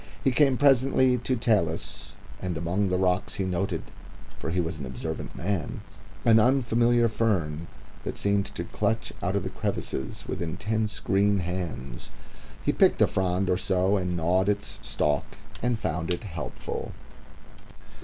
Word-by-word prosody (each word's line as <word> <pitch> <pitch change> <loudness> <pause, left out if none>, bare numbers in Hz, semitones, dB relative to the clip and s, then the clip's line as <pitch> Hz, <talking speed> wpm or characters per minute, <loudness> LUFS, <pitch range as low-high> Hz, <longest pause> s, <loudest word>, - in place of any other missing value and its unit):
He 135 - +4
came 135 0 +4
presently 130 -2 +4
to 130 +2 0
talus, 105 -9 0 0.3
and 90 -3 -2
among 90 +4 0
the 90 - +1
rocks 90 0 +1
he 95 - -1
noted 95 +1 -1 0.6
for - - -3
he 90 +2 0
was 80 -2 -2
an 70 - -4
observant 80 +5 -5
man 90 -3 -2 0.4
an 115 -1 +7
unfamiliar 120 -1 +4
fern 85 -9 0 0.4
that - - -4
seemed 100 -1 +1
to - - -2
clutch 110 0 -1
out 95 +1 0
of 100 - +1
the 95 - -3
crevices 100 -10 -3
with - - -3
intense 105 +6 -1
green 100 +1 +2
hands. 85 -9 -4 0.6
He - - +4
picked - - +4
a - - +7
frond 95 0 0
or 90 0 +2
so 95 +1 +2
and 90 -2 -1
gnawed 90 +4 +2
its 105 - -1
stalk 75 -1 -1 0.2
and 125 -1 +1
found 90 -4 -2
it 90 +6 -1
helpful. 80 - -5
95 Hz, 155 wpm, -27 LUFS, 85-110 Hz, 0.6 s, an